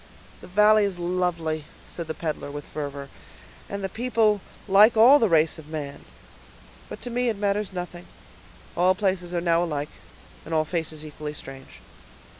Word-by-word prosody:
"The - - -11
valley 210 +3 +5
is 200 -3 -1
lovely," 175 -3 -1 0.2
said 170 -2 -7
the 160 - -4
peddler, 155 -2 -4
with 145 0 -7
fervor, 140 -2 -6 0.6
"and 200 0 -5
the - - 0
people 220 -2 +1 0.3
like 210 +4 +6
all 255 +6 +8
the 225 - +3
race 160 -1 +3
of 155 - -12
man. 145 -2 -6 0.8
But - - -8
to 245 - -5
me 245 +1 +1
it 220 - -2
matters 205 0 -1
nothing; 180 -1 -7 0.7
all 180 +2 +4
places 190 -3 -1
are 170 - 0
now 170 0 +2
alike, 150 -3 -3 0.5
and 160 - -4
all 155 0 +2
faces 160 -2 -4
equally 150 0 -7
strange." 135 -2 -11
175 Hz, 165 wpm, -25 LUFS, 155-205 Hz, 0.8 s, all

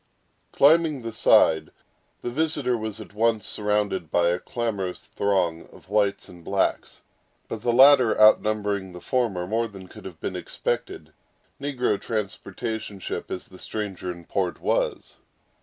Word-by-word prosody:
Climbing 155 -2 +4
the 115 - -4
side, 80 -7 +4 0.5
the 120 - -3
visitor 145 -3 0
was 110 -2 -5
at 110 - -11
once 110 0 +1
surrounded 105 -5 -1
by 85 0 +3
a 90 +1 0
clamorous 100 -5 -3
throng 90 -5 -1
of - - -18
whites 100 -1 +1
and 85 -1 -14
blacks, 95 +3 -1 0.4
but 110 - -5
the 120 - +1
latter 130 -2 +6
outnumbering 105 -3 +3
the 90 - -8
former 110 -7 -1
more 115 +4 0
than 95 -3 -12
could - - -13
have 90 -4 -9
been - - -4
expected, - - -4 0.5
negro 125 -7 -1
transportation 105 0 -4
ship - - -5
as 90 - -6
the 95 - -14
stranger 100 -4 -4
in 85 -1 -11
port 90 -1 -2
was. - - -1
105 Hz, 145 wpm, -25 LUFS, 95-115 Hz, 0.5 s, latter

